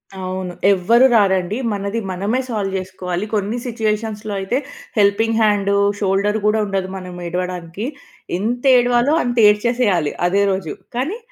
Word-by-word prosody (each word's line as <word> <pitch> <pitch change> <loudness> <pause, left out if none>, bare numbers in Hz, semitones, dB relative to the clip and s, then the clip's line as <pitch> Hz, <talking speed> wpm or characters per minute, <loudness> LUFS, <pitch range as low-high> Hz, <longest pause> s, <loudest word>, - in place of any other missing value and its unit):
అవును. 185 -1 -4 0.2
ఎవ్వరు 230 +7 +4
రారండి. 195 -2 +2
మనది 200 +2 -2
మనమే 200 +7 -1
సాల్వ్ 205 -4 -2
చేసుకోవాలి. 185 0 -4
కొన్ని 210 +2 -1
సిట్యుయేషన్స్‌లో 215 -2 -2
అయితే 195 +6 -1 0.4
హెల్పింగ్ 215 +2 +3
హ్యాండు, 205 -2 +2 0.2
షోల్డరు 200 +2 +1
గూడా 210 +1 +3
ఉండదు 195 -2 -2
మనం 180 -1 -8
ఏడవడానికి. 180 +2 -4 0.5
ఎంత 235 +6 -2
ఏడవాలో 245 +3 +3
అంత 245 0 -2
ఏడ్చేసేయాలి 210 -7 +2 0.2
అదే 195 +3 +2
రోజు. 190 -5 -3 0.2
కానీ 285 - -2
200 Hz, 125 wpm, -19 LUFS, 185-225 Hz, 0.5 s, ఎవ్వరు